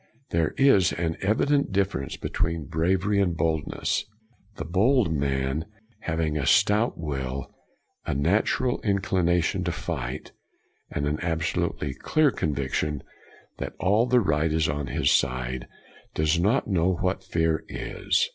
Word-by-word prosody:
There 80 -2 +1
is 100 -10 +5
an 85 -1 -1
evident 140 +6 +2
difference 95 -8 -1
between 85 -2 -2
bravery 95 +6 +1
and 90 -4 0
boldness. 80 -2 -1 0.5
The 80 - -5
bold 100 - +3
man, 70 +2 -1 0.3
having 80 -2 -1
a 70 - -1
stout 105 - +3
will, 70 -4 -4 0.5
a - - -2
natural 105 - +1
inclination 95 -3 +1
to 85 - 0
fight, 70 -7 -5 0.6
and 70 - -2
an 75 +1 -1
absolutely 80 -4 -1
clear 150 - +2
conviction 75 - -2 0.6
that - - -5
all 105 +6 +3
the 125 0 +4
right 80 -4 +1
is 80 0 +2
on 70 0 -2
his - - +1
side, 65 0 0 0.5
does 80 +2 +2
not 105 +10 +2
know 95 -2 +2
what 95 +2 -1
fear 80 -4 0
is. - - 0
85 Hz, 130 wpm, -26 LUFS, 75-95 Hz, 0.6 s, is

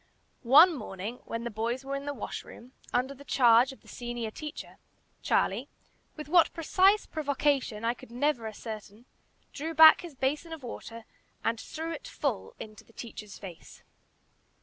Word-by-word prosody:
One 330 +7 +9
morning, 215 -3 -6
when 230 0 -4
the 235 - -4
boys 235 +5 -2
were 275 +1 -3
in 275 0 -5
the 285 - -1
washroom, 240 +1 -8 0.2
under 255 +3 0
the 280 +1 -14
charge 245 -1 +5
of 265 - -14
the - - -22
senior 240 -2 -5
teacher, 300 +5 -8 0.4
Charlie, - - +1 0.5
with 305 -2 -8
what 340 +1 +5
precise 380 +5 +3
provocation 280 -6 0
I 235 - +2
could 245 - -15
never 245 -1 0
ascertain, 215 0 -8 0.5
drew 320 +3 -4
back 315 0 +9
his 340 -5 -10
basin 295 +5 -1
of 315 -4 -9
water 230 -1 -8 0.4
and 225 0 0
threw 325 +1 -5
it 330 - -7
full - - -3
into 215 -1 -10
the 230 - -23
teacher's 215 -4 -9
face. 180 -5 -11
255 Hz, 160 wpm, -29 LUFS, 230-300 Hz, 0.5 s, One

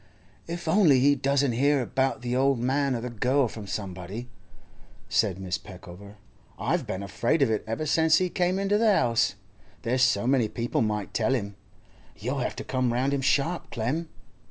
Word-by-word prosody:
'If 170 0 -6
only 160 -6 +5
he 140 +3 +5
doesn't 140 0 +1
hear 140 +4 +2
about 130 0 -1
the 120 0 -1
old 135 +1 +3
man 135 +2 0
or 115 - -3
the 125 0 -5
girl 125 +4 +1
from 110 -2 -9
somebody!' 95 +4 -6 0.8
said 95 -4 +1
Mrs. 95 -2 -4
Peckover. 95 +2 -12 0.4
'I've - - -1
been 95 +1 -4
afraid 120 - +1
of 115 - +1
it 110 - -1
ever 115 +8 -2
since 160 +1 +4
he 185 - +1
come 180 +1 0
into 200 +1 +1
the 225 -1 +4
'ouse. 120 - +2 0.5
There's 125 +2 0
so 110 -4 +3
many 130 -3 +3
people 115 +2 -2
might 105 -3 -2
tell 120 +4 +1
him. 100 -5 -4 0.6
You'll 125 +8 -3
have 125 - -2
to - - -6
come 130 -2 0
round 130 +4 0
him 140 - 0
sharp, 140 +6 0
Clem. 145 +9 -2
125 Hz, 180 wpm, -26 LUFS, 110-140 Hz, 0.8 s, only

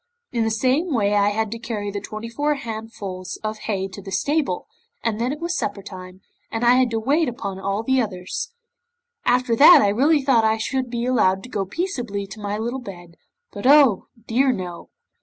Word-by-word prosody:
In 235 -2 0
the - - +1
same 260 +10 +1
way 205 -2 +2
I 205 0 +4
had 215 0 -1
to 230 - -5
carry 210 -3 -4
the 200 0 -4
twenty 215 +1 -7
four 290 +6 0
handfuls 215 -7 -6
of 215 0 -3
hay 195 -2 -1
to 195 +1 -9
the 195 0 -9
stable, 285 - 0 0.4
and 225 -1 -1
then 245 +2 0
it 295 - -5
was 340 +1 -2
supper 205 -7 -3
time, 185 -1 -10 0.3
and 225 +1 -1
I 240 - +7
had 255 -1 +3
to 225 -1 -1
wait 285 +6 +2
upon 200 -6 -5
all 200 +3 -2
the 265 +2 +2
others. 190 - -4 0.7
After 245 -1 +2
that 300 +6 +9
I 205 - +3
really 280 +8 +3
thought 255 -4 +4
I 220 0 +2
should 260 +3 -2
be 235 0 -2
allowed 190 -7 +2
to 250 - -10
go 200 -5 -2
peaceably 240 - -3
to 200 +2 -10
my 205 0 -2
little 240 +4 -3
bed, 175 -6 -10 0.4
but, 205 +5 -3
oh 275 -8 +6 0.2
dear 260 +4 +2
no! 180 -6 -6
225 Hz, 205 wpm, -22 LUFS, 200-255 Hz, 0.7 s, that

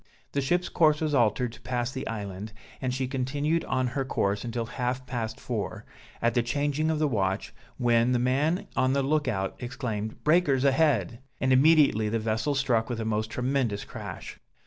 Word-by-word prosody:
The 140 - 0
ship's 175 +6 +1
course 155 -3 +3
was 155 -2 -1
altered 120 -1 +2
to - - -14
pass 125 -1 -2
the 130 +1 -5
island, 105 -1 -5 0.3
and 130 -1 -1
she 130 +1 -1
continued 145 +5 -1
on 130 0 0
her 135 +2 -1
course 100 -5 -1
until 115 -1 -3
half 125 +2 -3
past 115 -3 -4
four, - - -4 0.4
at 115 0 +3
the 120 - +3
changing 145 +5 0
of 160 - +1
the 155 0 +2
watch, 100 -6 -1 0.2
when 120 -1 +3
the 125 - +3
man 140 +8 +1
on 130 0 +2
the 140 0 +1
look 150 +1 +1
out 95 -5 -1
exclaimed, 115 -4 -4
breakers 150 -5 +3
ahead! 135 - +2 0.2
and 130 0 +2
immediately 140 -6 +5
the 115 - 0
vessel 110 +6 -1
struck 125 -4 +1
with 120 -2 -3
a 110 - -2
most 110 0 -1
tremendous 125 -4 -1
crash. - - -8
125 Hz, 185 wpm, -27 LUFS, 115-140 Hz, 0.4 s, immediately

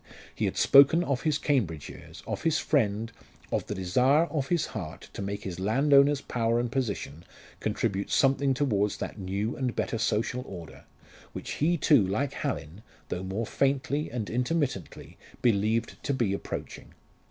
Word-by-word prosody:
He - - -1
had - - -2
spoken 140 +5 +6
of 140 -6 -1
his 155 -2 +1
Cambridge 95 - 0
years, - - -11
of - - -4
his 160 -1 +2
friend, 115 -7 0 0.4
of - - -1
the 105 - -3
desire 125 - +3
of 140 -4 -1
his 170 0 +1
heart 85 -8 -7
to - - -6
make 100 +1 -4
his 90 -2 -5
landowner's 140 +7 +4
power 115 -1 0
and 120 -1 -2
position 100 - -3 0.4
contribute 100 +1 -1
something 135 0 +3
towards 105 -7 +1
that - - -6
new 100 +5 -2
and 125 -3 -2
better 115 - -2
social 115 +3 0
order, 85 -4 -10 0.5
which - - -6
he 170 +4 +1
too, 145 -4 +5
like 105 +9 -1
Hallin 80 +8 -4 0.3
though 90 - -3
more 95 +5 -3
faintly 140 +4 0
and 115 -3 -4
intermittently 125 - -2 0.2
believed 110 0 +1
to 140 - -1
be 115 -6 +1
approaching. 100 - -6
120 Hz, 160 wpm, -28 LUFS, 100-140 Hz, 0.5 s, spoken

